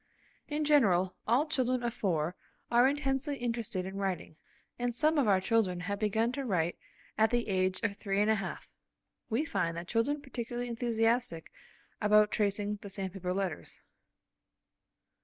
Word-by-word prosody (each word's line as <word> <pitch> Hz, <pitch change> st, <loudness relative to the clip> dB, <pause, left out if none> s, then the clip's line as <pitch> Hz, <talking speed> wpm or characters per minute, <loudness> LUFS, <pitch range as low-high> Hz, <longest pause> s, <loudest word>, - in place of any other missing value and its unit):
In 300 Hz, 0 st, -1 dB
general, 190 Hz, -12 st, +4 dB
all 245 Hz, +7 st, +3 dB
children 255 Hz, -5 st, 0 dB
of 235 Hz, -1 st, -1 dB
four 175 Hz, -6 st, -1 dB, 0.4 s
are 240 Hz, +2 st, +6 dB
intensely 275 Hz, 0 st, -1 dB
interested 230 Hz, -6 st, -2 dB
in 190 Hz, +1 st, -6 dB
writing, 190 Hz, -5 st, -3 dB, 0.4 s
and 240 Hz, -1 st, -1 dB
some 305 Hz, +3 st, +3 dB
of 265 Hz, -, +2 dB
our 195 Hz, -2 st, +5 dB
children 190 Hz, -3 st, +1 dB
have 200 Hz, +2 st, -3 dB
begun 220 Hz, +2 st, +1 dB
to 275 Hz, +2 st, -3 dB
write 175 Hz, -8 st, 0 dB, 0.4 s
at 220 Hz, 0 st, +5 dB
the 240 Hz, 0 st, 0 dB
age 185 Hz, -1 st, +1 dB
of 205 Hz, -3 st, 0 dB
three 195 Hz, -1 st, -1 dB
and 210 Hz, -, +3 dB
a 220 Hz, -, +5 dB
half. 195 Hz, -3 st, -4 dB, 0.6 s
We 245 Hz, +7 st, +1 dB
find 170 Hz, -, -1 dB
the 170 Hz, -, -5 dB
children 235 Hz, +9 st, 0 dB
particularly 245 Hz, -3 st, -5 dB
enthusiastic 230 Hz, -4 st, 0 dB, 0.5 s
about 210 Hz, 0 st, +5 dB
tracing 205 Hz, 0 st, 0 dB
the 200 Hz, 0 st, -9 dB
sandpaper 190 Hz, -2 st, -4 dB
letters. 185 Hz, -4 st, -4 dB
220 Hz, 155 wpm, -31 LUFS, 190-245 Hz, 0.6 s, are